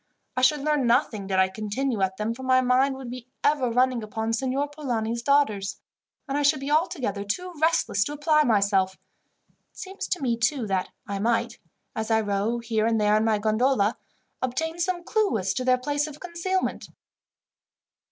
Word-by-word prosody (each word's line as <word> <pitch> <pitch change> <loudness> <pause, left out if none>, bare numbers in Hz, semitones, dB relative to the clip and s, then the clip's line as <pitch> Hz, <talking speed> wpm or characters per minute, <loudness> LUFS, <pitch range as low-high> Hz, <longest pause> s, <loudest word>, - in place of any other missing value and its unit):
I 255 - 0
should 275 +3 +4
learn 295 -3 +1
nothing 230 -5 +1
did 190 -1 0
I 190 0 +5
continue 215 +4 -2
at 190 0 0
them, 215 +2 -1
for 250 - -10
my 255 0 +3
mind 255 +2 +2
would 260 -2 -8
be 250 -1 -8 0.2
ever 285 -4 +2
running 250 0 +2
upon 220 +1 -3
Signor 265 +4 0
Polani's 235 -6 -3
daughters, 220 -8 +1 0.5
and 275 - -2
I 290 - +1
should 290 +1 +3
be 275 +2 -4
altogether 290 - 0
too 360 - -4
restless 315 -11 +2
to 290 - -4
apply 305 +1 +3
myself. 200 -6 +2 0.8
It - - -27
seems 385 0 -6
to 360 - -1
me, 240 -4 0
too, 235 +2 0
that 190 -2 -1 0.2
I 200 -1 -4
might, 235 +2 0 0.4
as 220 0 -3
I 220 0 +4
row 205 +3 -1
here 225 -2 0
and 225 -1 +1
there 210 0 +3
in 215 - +3
my 220 -1 +2
gondola, 215 +1 +2 0.5
obtain 320 +7 -2
some 350 0 -1
clue 425 - +1
as 190 -1 -1
to 255 - -2
their 255 0 +3
place 290 +3 -1
of 300 -1 -10
concealment." 360 +2 -2
250 Hz, 185 wpm, -25 LUFS, 215-290 Hz, 0.8 s, I